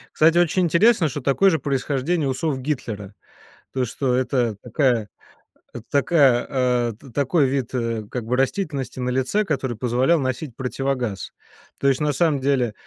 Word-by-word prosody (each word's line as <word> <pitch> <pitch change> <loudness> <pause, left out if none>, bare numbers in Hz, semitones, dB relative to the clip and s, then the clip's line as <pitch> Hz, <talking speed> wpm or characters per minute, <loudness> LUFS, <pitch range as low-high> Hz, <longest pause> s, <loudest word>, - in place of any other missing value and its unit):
Кстати, 160 +2 +4
очень 175 +1 +3
интересно, 170 0 +4
что 145 +1 -5
такое 140 +9 +3
же 160 - +2
происхождение 140 +3 -1
усов 135 +1 -2
Гитлера. 110 -8 -4 0.6
То, 130 -1 0
что 125 +2 -2
это 125 -3 0
такая 120 -4 0 0.8
такая, 140 -4 +3
а, 125 -3 +1
т 130 +6 -16
такой 140 +4 +2
вид, 130 -2 -2
э, 115 -3 -2
как 125 - -4
бы 125 +2 -1
растительности 135 -1 -2
на 125 - -1
лице, 130 +12 +1
который 135 - -2
позволял 125 +8 +2
носить 130 0 -3
противогаз. 125 -5 -3 0.5
То 140 - +4
есть 135 - +1
на 150 -1 0
самом 150 -1 +1
деле, 130 -4 +1
135 Hz, 155 wpm, -22 LUFS, 125-150 Hz, 0.8 s, Кстати